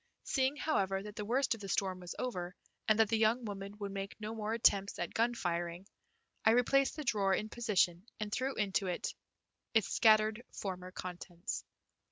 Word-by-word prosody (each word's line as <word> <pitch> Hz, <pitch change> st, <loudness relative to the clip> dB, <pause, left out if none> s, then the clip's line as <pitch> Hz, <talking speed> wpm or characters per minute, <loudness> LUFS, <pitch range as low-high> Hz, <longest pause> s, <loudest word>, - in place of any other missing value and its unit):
Seeing, 265 Hz, +1 st, +1 dB
however, 195 Hz, -11 st, 0 dB
that 210 Hz, 0 st, -8 dB
the 210 Hz, -, -4 dB
worst 255 Hz, +5 st, +2 dB
of 225 Hz, -, -8 dB
the 195 Hz, -, -6 dB
storm 190 Hz, 0 st, 0 dB
was 180 Hz, -1 st, -7 dB
over, 180 Hz, -8 st, -3 dB, 0.3 s
and 215 Hz, -1 st, +5 dB
that 225 Hz, -1 st, +5 dB
the 225 Hz, -1 st, +2 dB
young 225 Hz, +2 st, +3 dB
woman 200 Hz, 0 st, -6 dB
would 200 Hz, -1 st, -4 dB
make 195 Hz, +1 st, -5 dB
no 215 Hz, +1 st, -4 dB
more 215 Hz, -1 st, -3 dB
attempts 200 Hz, -3 st, +3 dB
at 175 Hz, -, -3 dB
gun 235 Hz, +2 st, +2 dB
firing, 175 Hz, -2 st, -2 dB, 0.6 s
I 220 Hz, -, +6 dB
replaced 270 Hz, +3 st, +3 dB
the 305 Hz, -, -4 dB
drawer 200 Hz, -6 st, +2 dB
in 215 Hz, -, -3 dB
position 200 Hz, -5 st, +1 dB
and 210 Hz, -1 st, -3 dB
threw 260 Hz, +4 st, -1 dB
into 195 Hz, -2 st, 0 dB
it 180 Hz, -, -2 dB, 0.6 s
its 220 Hz, -3 st, +4 dB
scattered 215 Hz, +1 st, +4 dB
former 185 Hz, -2 st, -5 dB
contents. 180 Hz, 0 st, -5 dB
210 Hz, 185 wpm, -34 LUFS, 190-225 Hz, 0.6 s, I